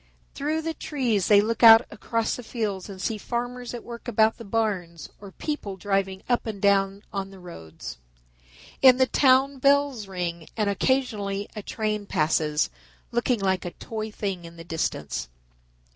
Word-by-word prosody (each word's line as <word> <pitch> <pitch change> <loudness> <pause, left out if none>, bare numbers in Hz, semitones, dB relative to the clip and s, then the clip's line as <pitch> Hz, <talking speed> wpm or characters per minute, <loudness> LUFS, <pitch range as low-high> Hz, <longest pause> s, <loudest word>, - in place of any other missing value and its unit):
Through 310 +3 -2
the 325 0 -2
trees 245 - -1
they 205 -1 +7
look 225 +1 -2
out 225 0 +10
across 225 +1 -1
the - - -7
fields 215 -5 -3
and 195 -2 -8
see 215 +2 -2
farmers 245 +2 -4
at 240 - -7
work 235 +1 -9
about 220 -1 +3
the - - -9
barns 195 -7 -2
or 200 -1 -11
people 205 -7 -4
driving 195 -1 -1
up 245 -2 +1
and 215 -3 -4
down 195 0 +2
on 195 -1 -3
the 195 - -13
roads. 125 - -9 0.8
In 255 -2 +8
the 260 - +5
town 265 +2 +3
bells 280 -5 +2
ring 170 -3 -4
and 210 -2 +1
occasionally 205 -4 0
a 210 - -4
train 210 -1 -3
passes, 150 - +1 0.4
looking 240 0 +1
like 190 -1 0
a 175 - -5
toy 220 -1 -5
thing 195 -4 -4
in 170 0 -11
the 165 - -10
distance. 160 - -3
210 Hz, 165 wpm, -25 LUFS, 190-240 Hz, 0.8 s, out